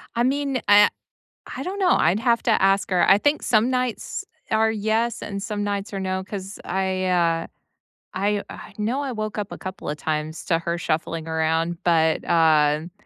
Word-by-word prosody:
I 235 Hz, -, +2 dB
mean, 275 Hz, 0 st, 0 dB
I 205 Hz, 0 st, +7 dB, 0.7 s
I -, -, -4 dB
don't 385 Hz, +3 st, -4 dB
know, 365 Hz, -2 st, +3 dB
I'd 185 Hz, +5 st, +3 dB
have 235 Hz, 0 st, +2 dB
to 235 Hz, -, +2 dB
ask 195 Hz, +1 st, +3 dB
her. 180 Hz, -2 st, +3 dB
I 195 Hz, -, +7 dB
think 290 Hz, +7 st, +1 dB
some 230 Hz, +1 st, +3 dB
nights 250 Hz, -2 st, -2 dB, 0.3 s
are 220 Hz, 0 st, +3 dB
yes 220 Hz, +2 st, -1 dB
and 200 Hz, -1 st, -5 dB
some 205 Hz, 0 st, -3 dB
nights 205 Hz, 0 st, -3 dB
are 195 Hz, -, -3 dB
no 190 Hz, 0 st, -2 dB
'cause 195 Hz, 0 st, -7 dB
I, 190 Hz, 0 st, -1 dB
uh, 170 Hz, -2 st, +1 dB, 0.7 s
I 200 Hz, +2 st, 0 dB
I -, -, -10 dB
know 230 Hz, +6 st, -1 dB
I 275 Hz, -2 st, -3 dB
woke 215 Hz, -1 st, -4 dB
up 205 Hz, -2 st, -4 dB
a -, -, -6 dB
couple 185 Hz, 0 st, -7 dB
a 150 Hz, -, -2 dB
times 155 Hz, +2 st, -3 dB
to 165 Hz, -2 st, +1 dB
her 170 Hz, +1 st, -2 dB
shuffling 165 Hz, -1 st, -2 dB
around, 160 Hz, +1 st, 0 dB
but, 160 Hz, -2 st, +2 dB
um, 155 Hz, -1 st, +3 dB
195 Hz, 190 wpm, -23 LUFS, 170-220 Hz, 0.7 s, I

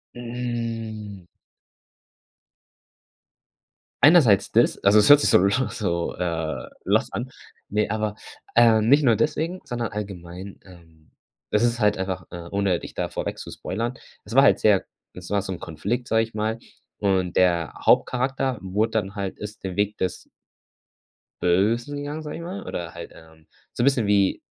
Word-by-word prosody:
Hm. 115 Hz, -4 st, -5 dB, 2.8 s
Einerseits 145 Hz, -, +6 dB
des -, -, +2 dB
also 100 Hz, +2 st, +5 dB
es 105 Hz, +4 st, +5 dB
hört 145 Hz, -, +10 dB
sich -, -, +2 dB
so -, -, +7 dB
l 100 Hz, -, +3 dB, 0.2 s
so, 85 Hz, -5 st, -2 dB
äh, 80 Hz, -3 st, -3 dB, 0.2 s
lost -, -, +1 dB
an. -, -, -4 dB, 0.4 s
Ne, 105 Hz, +1 st, +1 dB
aber, 110 Hz, -1 st, -2 dB, 0.4 s
ähm, 115 Hz, -1 st, +5 dB
nicht 145 Hz, +2 st, +6 dB
nur 115 Hz, -4 st, +4 dB
deswegen, 165 Hz, -, -1 dB
sondern 120 Hz, -3 st, -3 dB
allgemein, 95 Hz, -2 st, -7 dB
ähm. 80 Hz, -4 st, -18 dB, 0.5 s
Das 105 Hz, -, +3 dB
ist 120 Hz, -1 st, +1 dB
halt 105 Hz, 0 st, +3 dB
einfach, 95 Hz, -2 st, -4 dB
äh, 85 Hz, -1 st, -8 dB
ohne 100 Hz, -3 st, 0 dB
dich -, -, -10 dB
da -, -, -3 dB
vorweg -, -, -4 dB
zu -, -, -8 dB
spoilern, 115 Hz, +5 st, -4 dB, 0.3 s
es 105 Hz, -, -10 dB
war 135 Hz, -, +8 dB
halt -, -, +5 dB
sehr 105 Hz, -3 st, +3 dB, 0.3 s
es 90 Hz, -1 st, -10 dB
war 100 Hz, -1 st, +1 dB
so 95 Hz, 0 st, -6 dB
'n 90 Hz, -, -5 dB
Konflikt, 100 Hz, +10 st, -3 dB
sage 115 Hz, 0 st, +3 dB
ich 115 Hz, -, -8 dB
mal, 110 Hz, +1 st, -1 dB, 0.4 s
und 95 Hz, -3 st, 0 dB
der 85 Hz, -3 st, +2 dB
Hauptcharakter 130 Hz, 0 st, +2 dB
wurde 105 Hz, +4 st, -1 dB
dann 105 Hz, -2 st, -2 dB
halt 100 Hz, -2 st, -4 dB
ist 105 Hz, +1 st, -8 dB
den 95 Hz, -, -4 dB
Weg 105 Hz, +1 st, 0 dB
des 90 Hz, -, -4 dB, 1.1 s
Bösen 110 Hz, +10 st, +1 dB
gegangen, 145 Hz, +2 st, -5 dB
sage 150 Hz, -1 st, -6 dB
ich -, -, -7 dB
mal, 185 Hz, +4 st, -6 dB
oder 85 Hz, -1 st, -5 dB
halt, 85 Hz, -, -9 dB
ähm, 80 Hz, -1 st, -18 dB, 0.3 s
so -, -, -3 dB
'n -, -, +3 dB
bisschen 135 Hz, -5 st, +3 dB
wie 100 Hz, -2 st, +2 dB
105 Hz, 165 wpm, -24 LUFS, 95-120 Hz, 2.8 s, hört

